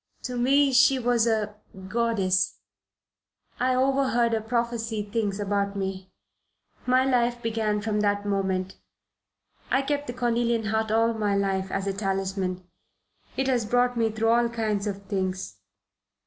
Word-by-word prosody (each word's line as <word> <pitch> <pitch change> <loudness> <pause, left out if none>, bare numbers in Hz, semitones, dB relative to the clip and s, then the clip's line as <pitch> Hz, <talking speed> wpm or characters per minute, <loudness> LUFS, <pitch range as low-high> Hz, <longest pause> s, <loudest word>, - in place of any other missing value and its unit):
To 250 - -4
me 270 +3 +3
she 270 +1 +5
was 240 -2 +2
a 210 -2 0 0.3
goddess. 195 -4 +1 1.0
I 255 +1 +2
overheard 260 -3 +2
her 220 - +1
prophesy 230 -1 -2
things 205 -1 -2
about 200 0 -1
me. 190 -1 -4 0.8
My 255 +1 +4
life 245 -2 +1
began 220 -2 0
from 210 0 -1
that 205 0 0
moment. 190 -2 -1 0.9
I 270 - +2
kept 290 +1 -2
the 245 - -4
cornelian 235 -1 0
heart 220 0 0
all 225 +1 +2
my 210 -2 0
life, 195 -1 0
as 195 +1 -2
a 195 - -1
talisman. 190 -2 -2 0.7
It 265 - +1
has 250 -3 +2
brought 245 +3 +1
me 225 -1 +1
through 220 +1 0
all 235 0 +3
kinds 215 -3 -1
of 200 -1 -4
things. 190 - -3
220 Hz, 145 wpm, -26 LUFS, 200-240 Hz, 1.0 s, she